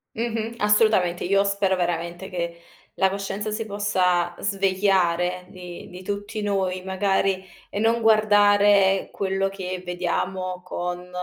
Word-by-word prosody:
Mh-mh. 230 Hz, 0 st, -2 dB
Assolutamente. 210 Hz, -4 st, +3 dB
Io 195 Hz, +2 st, +3 dB
spero 200 Hz, -1 st, +1 dB
veramente 175 Hz, +1 st, -3 dB
che 170 Hz, -1 st, -4 dB, 0.3 s
la 190 Hz, 0 st, +2 dB
coscienza 200 Hz, +2 st, -4 dB
si 225 Hz, +1 st, -2 dB
possa 185 Hz, -4 st, +1 dB
svegliare 185 Hz, -3 st, +1 dB
di 180 Hz, -1 st, -10 dB
di 180 Hz, +1 st, -10 dB
tutti 205 Hz, +2 st, -4 dB
noi 190 Hz, -2 st, -1 dB
magari, 190 Hz, 0 st, 0 dB, 0.3 s
e 200 Hz, -, -4 dB
non 230 Hz, +2 st, +2 dB
guardare 205 Hz, -3 st, +4 dB
quello 195 Hz, 0 st, -1 dB
che 185 Hz, -2 st, -5 dB
vediamo 180 Hz, +1 st, -3 dB
con 180 Hz, 0 st, -5 dB
190 Hz, 125 wpm, -24 LUFS, 180-205 Hz, 0.3 s, guardare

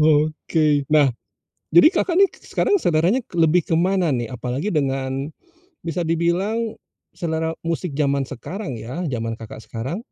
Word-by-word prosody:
Oke. 155 Hz, -1 st, +2 dB
Nah, 145 Hz, -4 st, +4 dB, 0.6 s
jadi 170 Hz, -, +8 dB
Kakak 345 Hz, 0 st, +1 dB
nih, 395 Hz, 0 st, +7 dB
k -, -, -14 dB
sekarang 405 Hz, -3 st, +2 dB
seleranya 175 Hz, +9 st, +2 dB, 0.2 s
lebih 165 Hz, +2 st, +4 dB
kemana 175 Hz, +2 st, +1 dB
nih, 120 Hz, -4 st, -1 dB
apalagi 130 Hz, -, -3 dB
dengan 135 Hz, -1 st, -1 dB, 0.5 s
bisa 165 Hz, 0 st, -2 dB
dibilang 190 Hz, +7 st, 0 dB, 0.4 s
selera 160 Hz, -2 st, -1 dB, 0.2 s
musik 165 Hz, +1 st, -1 dB
zaman 140 Hz, -2 st, +2 dB
sekarang 135 Hz, -, -6 dB
ya, 130 Hz, +12 st, -5 dB
zaman 115 Hz, -2 st, -2 dB
Kakak 115 Hz, -1 st, -9 dB
sekarang, 125 Hz, -, -4 dB
160 Hz, 135 wpm, -22 LUFS, 135-175 Hz, 0.6 s, jadi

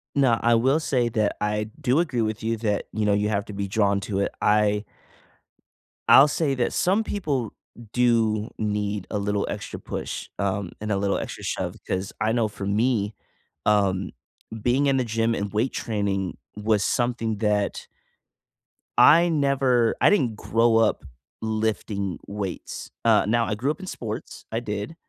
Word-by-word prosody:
No. 130 Hz, -5 st, +3 dB
I 120 Hz, 0 st, +4 dB
will 130 Hz, +6 st, +3 dB
say 125 Hz, -6 st, +1 dB
that 110 Hz, -3 st, 0 dB
I 105 Hz, 0 st, -1 dB
do 135 Hz, +1 st, +2 dB
agree 135 Hz, -9 st, 0 dB
with 110 Hz, 0 st, -2 dB
you 115 Hz, +1 st, 0 dB
that, 105 Hz, -2 st, -1 dB
you 110 Hz, 0 st, -1 dB
know, 105 Hz, -, +3 dB
you 105 Hz, +1 st, +1 dB
have 100 Hz, -1 st, -1 dB
to 105 Hz, -, -9 dB
be 100 Hz, 0 st, -3 dB
drawn 100 Hz, 0 st, +2 dB
to 100 Hz, 0 st, -2 dB
it. 100 Hz, -, 0 dB
I 105 Hz, 0 st, +2 dB, 1.2 s
I'll 140 Hz, -, +9 dB
say 150 Hz, -1 st, 0 dB
that 125 Hz, -2 st, 0 dB
some 195 Hz, +5 st, +2 dB
people 145 Hz, -, -2 dB, 0.4 s
do 115 Hz, -3 st, +2 dB
need 105 Hz, -2 st, -2 dB
a 105 Hz, -, -1 dB
little 100 Hz, 0 st, 0 dB
extra -, -, -5 dB
push, -, -, -5 dB
um, 100 Hz, -2 st, -1 dB
and 105 Hz, 0 st, -3 dB
a 100 Hz, -, +1 dB
little 100 Hz, 0 st, 0 dB
extra -, -, -6 dB
shove -, -, -3 dB
'cause 95 Hz, +1 st, -2 dB
I 110 Hz, -, +2 dB
know 115 Hz, -1 st, +2 dB
for 105 Hz, -1 st, -7 dB
me, 105 Hz, 0 st, +1 dB, 0.5 s
um, 100 Hz, -2 st, +2 dB, 0.5 s
being 125 Hz, +5 st, +2 dB
in 135 Hz, -1 st, +3 dB
the 130 Hz, -, +2 dB
gym 115 Hz, 0 st, 0 dB
and 100 Hz, -1 st, -3 dB
weight 115 Hz, +5 st, 0 dB
training 100 Hz, -4 st, -2 dB, 0.2 s
was 105 Hz, -1 st, +1 dB
something 120 Hz, -3 st, 0 dB
that 105 Hz, -2 st, 0 dB, 1.1 s
I 170 Hz, +3 st, +7 dB
never 135 Hz, -6 st, +2 dB
I -, -, +7 dB
didn't 130 Hz, -, +2 dB
grow 115 Hz, +1 st, +2 dB
up 110 Hz, -7 st, +2 dB, 0.4 s
lifting 110 Hz, -4 st, -2 dB
weights. 100 Hz, -3 st, -5 dB, 0.2 s
Uh, 110 Hz, -2 st, +5 dB
now 115 Hz, +2 st, +2 dB
I 105 Hz, -, -2 dB
grew 120 Hz, +7 st, -1 dB
up 155 Hz, -, -2 dB
in 190 Hz, -, -7 dB
sports, 110 Hz, -11 st, -6 dB
I 115 Hz, -, 0 dB
did. 105 Hz, +5 st, -5 dB
110 Hz, 170 wpm, -24 LUFS, 105-120 Hz, 1.2 s, I'll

